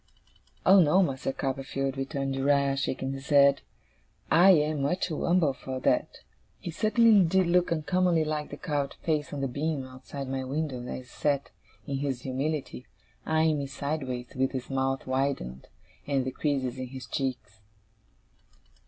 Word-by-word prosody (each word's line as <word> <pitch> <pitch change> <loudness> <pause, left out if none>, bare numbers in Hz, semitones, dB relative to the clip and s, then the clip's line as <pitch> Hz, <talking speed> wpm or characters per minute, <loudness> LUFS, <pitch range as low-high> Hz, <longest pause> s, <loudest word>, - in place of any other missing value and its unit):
'Oh 190 +1 +8
no, 180 +4 +4
Master 135 -4 -2
Copperfield,' 135 0 -3
returned 135 0 -2
Uriah, 140 0 +2
shaking 135 0 -2
his 135 0 -8
head, 140 -1 +5 0.7
'I 175 +6 +7
am 155 -4 +4
much 145 +7 0
too 160 -4 -3
umble 170 -5 +3
for 130 0 -6
that!' - - 0 0.4
He 175 - -6
certainly 215 +2 +4
did 185 +2 +3
look 175 0 +2
uncommonly 170 0 +2
like 150 -1 -3
the 145 - -7
carved 145 -5 -2
face 150 -4 0
on 145 - -4
the 135 - 0
beam 140 +1 -2
outside 130 +1 -8
my 135 0 -3
window, 135 -1 -3
as - - -4
he - - -14
sat, 140 +3 -2 0.3
in 140 - -3
his 135 -3 -3
humility, 135 0 -3 0.4
eyeing 160 -1 +2
me 140 - -3
sideways, 135 -3 -4
with 130 +1 0
his 130 0 -5
mouth 135 0 -1
widened, 130 - -2 0.4
and 135 -3 +1
the 130 - -2
creases 130 -3 -2
in 130 - -4
his 130 0 -8
cheeks. 125 -6 -4
140 Hz, 160 wpm, -28 LUFS, 130-155 Hz, 0.7 s, Oh